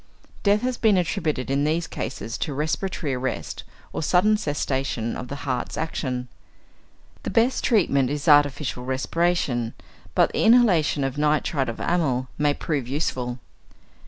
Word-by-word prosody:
Death 205 +1 +3
has 255 -1 -1
been 215 -4 +4
attributed 155 -6 -1
in 140 +1 +2
these 160 +3 +1
cases 115 +1 -5
to 145 - -2
respiratory 155 0 -2
arrest 130 +1 -3 0.3
or - - -2
sudden 185 +7 +3
cessation 135 - -2
of 125 - -6
the 140 - -5
heart's 130 -3 -2
action. 130 -6 -3 0.9
The - - -4
best 235 +3 +2
treatment 140 - +3
is 145 +3 -3
artificial 145 -3 +3
respiration, 130 -2 0 0.4
but - - +4
the - - +1
inhalation 200 - +4
of 135 +1 -2
nitrite 150 -3 +1
of 115 - -6
amyl 135 -8 0
may 145 -1 +2
prove 140 -7 -2
useful. 125 -3 -2
145 Hz, 140 wpm, -24 LUFS, 130-170 Hz, 0.9 s, been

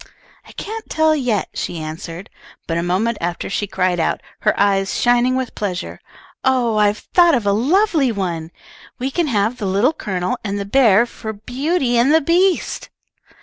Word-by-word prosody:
"I - - -13
can't 440 +1 -7
tell 315 0 +3
yet," 245 -9 -1
she 175 - -4
answered, 165 +4 -7 0.3
but 165 0 -1
a - - 0
moment 195 +6 0
after 175 +2 -3
she 205 +1 -1
cried 185 -2 0
out, 160 - 0 0.2
her - - +1
eyes 195 -1 +1
shining 245 +1 +3
with 260 -1 -3
pleasure, 185 -3 -4 0.4
"Oh, 245 -4 +2
I've 210 0 +3 0.2
thought 345 -3 +6
of 235 -4 -1
a 200 - +3
lovely 295 - +2
one. 175 -6 -3 0.5
We 260 +2 -3
can 340 +2 0
have 220 -1 0
the 205 - -2
Little 205 +10 +2
Colonel 185 - -3
and 200 -2 -3
the 200 - -3
bear 230 -1 +4
for 220 -2 -7
'Beauty 250 - -1
and 255 +5 +4
the - - +6
Beast.'" 355 +4 +1
220 Hz, 175 wpm, -19 LUFS, 195-265 Hz, 0.5 s, thought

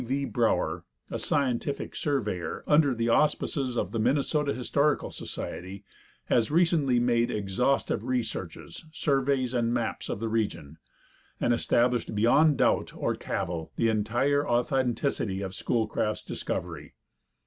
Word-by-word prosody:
V. 135 +3 -1
Brower, 120 -4 0 0.3
a - - -3
scientific 140 0 -1
surveyor, 105 - -2
under 150 -3 +4
the 115 0 -1
auspices 135 -1 +1
of - - -1
the 115 - -2
Minnesota 145 +4 +1
Historical 140 +3 0
Society, 95 +2 -6 0.4
has 115 -2 +2
recently 155 -6 +3
made 120 0 +2
exhaustive 105 +6 0
researches, 115 - -4
surveys 135 -4 0
and 120 -2 +1
maps 120 -1 -3
of - - -3
the 115 - -2
region, 105 -9 -2 0.6
and 120 - +2
established 120 -1 +1
beyond 140 +8 +4
doubt - - +1
or - - 0
cavil 85 -2 -4
the 115 - +2
entire 120 +7 +1
authenticity 120 -4 0
of 95 -1 -5
Schoolcraft's 110 -1 -1
discovery. - - -5
120 Hz, 125 wpm, -28 LUFS, 110-140 Hz, 0.6 s, under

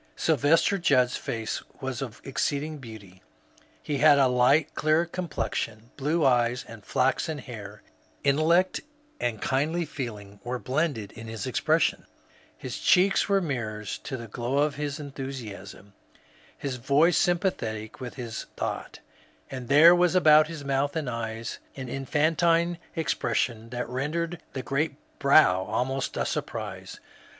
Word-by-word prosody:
Sylvester 160 +6 +3
Judd's 130 -6 +3
face 115 -1 -3 0.2
was 130 -3 -4
of 120 -5 -6
exceeding 145 +3 -2
beauty; 105 -7 -12 0.6
he 145 -2 -2
had 150 0 +7
a 135 - +5
light 125 +5 +3
clear 155 +3 +2
complexion, 115 - -4
blue 150 +4 0
eyes, 125 0 +2
and 115 -2 -11
flaxen 135 +7 0
hair; 105 -6 -9 0.4
intellect 160 +6 +3 0.4
and 115 -3 -2
kindly 155 +6 0
feeling 105 -8 -7
were 125 +1 -3
blended 130 -5 -1
in 115 0 -10
his 110 -3 -5
expression; - - +1 0.5
his - - -6
cheeks 195 +2 +4
were 195 -1 +3
mirrors 110 - -4
to 130 - -5
the 115 -1 -8
glow 120 +5 -2
of 145 0 +2
his 145 0 -4
enthusiasm, 125 -9 -8 0.6
his 135 -3 -4
voice 140 +7 +3
sympa 180 +1 +2
thetic 110 -4 -6
with 125 -2 -7
his 120 -4 -6
thought; - - -4 0.5
and 130 -2 -6
there 155 +6 +8
was 175 0 +3
about 155 -3 +6
his 160 -3 -7
moutii 140 +1 0
and 150 -6 -2
eyes 115 -1 -4 0.2
an 130 -2 -6
infantine 165 +6 +1 0.2
expression 120 -7 -1
that 125 0 -4
rendered 160 +7 -3
the 130 - -4
great 140 +4 -1 0.2
brow 140 -10 +5
almost 130 +5 -2
a - - 0
surprise. - - -5
135 Hz, 140 wpm, -27 LUFS, 115-155 Hz, 0.6 s, there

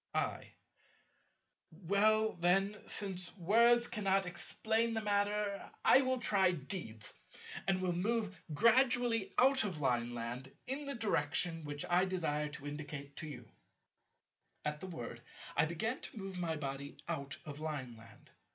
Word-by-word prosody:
I. - - -2 1.2
Well 205 +6 +2
then, 195 +4 +2
since 185 -2 -2
words 235 +6 +5
cannot 195 -3 +1
explain 220 +6 0
the 220 - 0
matter, 205 -1 0 0.2
I 265 - +8
will 260 -1 +1
try 200 -5 +3
deeds, 135 - -4 0.5
and 190 -1 +2
will 180 -1 +1
move 210 +2 0 0.2
gradually 230 - +3
out 265 0 +5
of 185 -7 -3
Lineland 120 0 -2
in 280 +2 -3
the 280 - -2
direction 175 -7 +1
which 145 0 -4
I 180 +2 +4
desire 150 -5 -1
to 145 -1 -9
indicate 145 -1 -6
to 155 - -5
you. 150 - -9 1.1
At 150 0 -2
the 190 - -7
word 120 -8 -6 0.3
I 150 - +4
began 195 +10 -2
to - - -9
move 195 -2 -5
my 165 -2 -1
body 140 -1 -5
out 140 -4 -4
of 150 -1 -7
Lineland. 130 -7 -7
185 Hz, 135 wpm, -35 LUFS, 150-215 Hz, 1.2 s, I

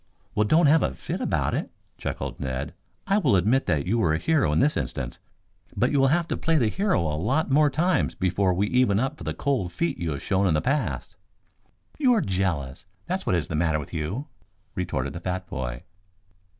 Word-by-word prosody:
"Well, 105 0 +2
don't 160 +7 +5
have 155 +2 +5
a - - -1
fit - - -5
about - - 0
it," - - -2 0.3
chuckled - - -4
Ned. 65 -1 -3 0.3
"I 200 +1 +2
will 140 - +3
admit 110 +9 +2
that 75 -4 +1
you 115 +6 +1
were 80 -7 +2
a - - +1
hero 145 - +2
in 75 - +1
this 150 - +3
instance, 60 -4 -4 0.6
but - - +2
you 145 - +2
will 135 - +5
have 170 +4 +2
to - - 0
play 165 0 +1
the 115 -7 +2
hero 195 - +1
a 75 -2 -1
lot 130 - 0
more 150 +2 +5
times 175 +5 +1
before 95 +1 +1
we 95 +3 +1
even 125 -6 +3
up 135 +5 -2
for - - -8
the - - -3
cold 125 -11 -1
feet 85 -1 -2
you 85 -2 -2
have 70 - -6
shown 100 0 +1
in 80 - +2
the - - +3
past." 140 - -2 0.8
"You're 250 -7 +4
jealous 85 - -2 0.2
that's 185 +2 -3
what 90 - +3
is 80 -3 -1
the - - -5
matter 80 0 +1
with 75 +1 -7
you," 85 - -3 0.5
retorted 70 -8 -2
the 85 - -5
fat 90 +1 -3
boy. 65 -1 -5
95 Hz, 215 wpm, -25 LUFS, -, 0.8 s, don't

